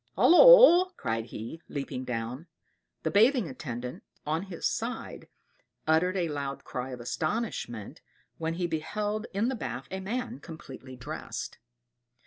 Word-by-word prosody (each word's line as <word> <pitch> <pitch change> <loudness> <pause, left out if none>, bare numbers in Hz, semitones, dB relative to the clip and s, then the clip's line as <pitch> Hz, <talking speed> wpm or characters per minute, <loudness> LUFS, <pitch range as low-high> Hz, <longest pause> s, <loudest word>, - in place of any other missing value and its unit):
"Holloa!" 370 -3 +8
cried 115 0 -2
he, 120 +8 -8
leaping 135 -2 -4
down. 125 +6 -4 0.6
The 160 - 0
bathing 230 - +4
attendant, 125 -2 -6 0.2
on 155 +2 0
his 180 -4 -6
side, - - -4 0.6
uttered 180 +4 +2
a 175 -2 +1
loud 140 -2 -4
cry 125 +1 -5
of 125 -1 -7
astonishment 120 - -3 0.4
when 165 0 -2
he 175 0 -1
beheld 210 +7 -2
in 200 +4 0
the 265 - 0
bath, 135 - -5
a 190 - -3
man 240 +5 -4
completely 135 -5 -10
dressed. 125 - -6
160 Hz, 130 wpm, -29 LUFS, 130-210 Hz, 0.6 s, Holloa